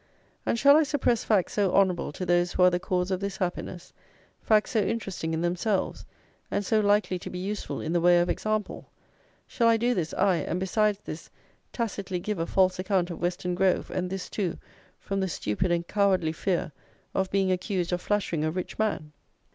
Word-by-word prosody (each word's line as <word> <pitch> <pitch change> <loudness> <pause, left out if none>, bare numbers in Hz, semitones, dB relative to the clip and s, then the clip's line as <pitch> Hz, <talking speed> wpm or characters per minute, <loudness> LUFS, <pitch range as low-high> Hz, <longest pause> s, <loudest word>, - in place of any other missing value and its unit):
And - - +1
shall 280 +4 +7
I - - +5
suppress 280 -6 +1
facts 205 -5 +1
so 200 -3 +2
honourable 185 -6 +2
to 185 - -4
those 175 0 +2
who 180 - +3
are 180 - +7
the 175 - 0
cause 180 +1 -1
of 185 - 0
this 200 0 -4
happiness, 180 -1 -4 0.5
facts 215 -1 +2
so 225 - +2
interesting 195 -6 -2
in 160 0 -1
themselves, 180 +4 -1 0.4
and 200 - -1
so 220 +3 +2
likely 205 -3 +2
to - - -7
be 180 - -6
useful 200 +3 -4
in 160 - -3
the 175 - +2
way 175 0 +6
of 175 - +2
example; 215 +1 -2 0.6
shall 235 - +1
I 230 0 +5
do 240 +2 +1
this, 170 -7 -2
aye, 195 -3 +3
and, 175 - -2
besides 210 +2 +1
this, 155 +2 -7 0.4
tacitly 200 -5 -3
give 210 0 -3
a 165 - -1
false 185 -1 +2
account 185 -2 0
of 170 - -7
Weston 180 0 -1
Grove, 185 +1 +1
and 180 0 -2
this, 190 0 -4
too, 185 -5 -2 0.4
from 195 0 -3
the 190 - 0
stupid 170 - -1
and 170 0 0
cowardly 190 -6 +2
fear 170 0 -1 0.4
of 190 -1 0
being 190 -1 +1
accused 180 -1 -1
of 180 - -1
flattering 195 -7 -1
a 155 - +1
rich 180 +5 -5
man? 205 -8 -1
185 Hz, 200 wpm, -27 LUFS, 175-205 Hz, 0.6 s, shall